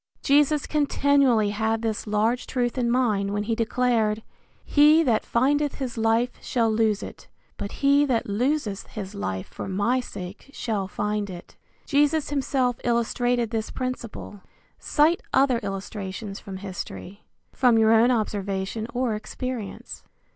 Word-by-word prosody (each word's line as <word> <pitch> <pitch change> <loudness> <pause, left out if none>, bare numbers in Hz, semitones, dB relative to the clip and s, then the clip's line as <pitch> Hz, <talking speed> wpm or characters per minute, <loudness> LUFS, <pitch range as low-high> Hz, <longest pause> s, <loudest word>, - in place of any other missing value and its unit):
Jesus 295 +1 +3
continually 280 -7 +2
had 220 +2 -1
this 220 -1 -2
large 220 +4 0
truth 245 -2 -1
in 245 -2 0
mind 220 -5 +1
when 205 0 -1
he 225 +2 -1
declared, 225 -2 +1 0.4
"He 305 +2 +5
that 235 -7 +2
findeth 285 +4 +1
his 255 -4 -4
life 225 +2 0
shall 230 -3 +1
lose 215 -2 +1
it, - - -10 0.3
but 200 - -6
he 280 +1 +5
that 240 -4 0
loseth 220 -1 -1
his 200 -2 -7
life 95 - -3
for - - -7
my 205 +7 +1
sake 195 -1 -8
shall 215 -5 -2
find 210 +1 -2
it." 175 -2 -10 0.3
Jesus 295 +1 +2
himself 265 -3 0
illustrated 240 0 0
this 220 -2 -2
principle. 245 -5 -5 0.4
Cite 315 +3 +2
other 260 -3 +4
illustrations 195 0 -5
from 190 -1 -8
history. 190 +1 -8 0.3
From 245 -3 +4
your 220 0 +5
own 225 +2 +5
observation 205 -2 -1
or 250 -2 0
experience. 220 +1 -6
230 Hz, 140 wpm, -25 LUFS, 210-255 Hz, 0.4 s, He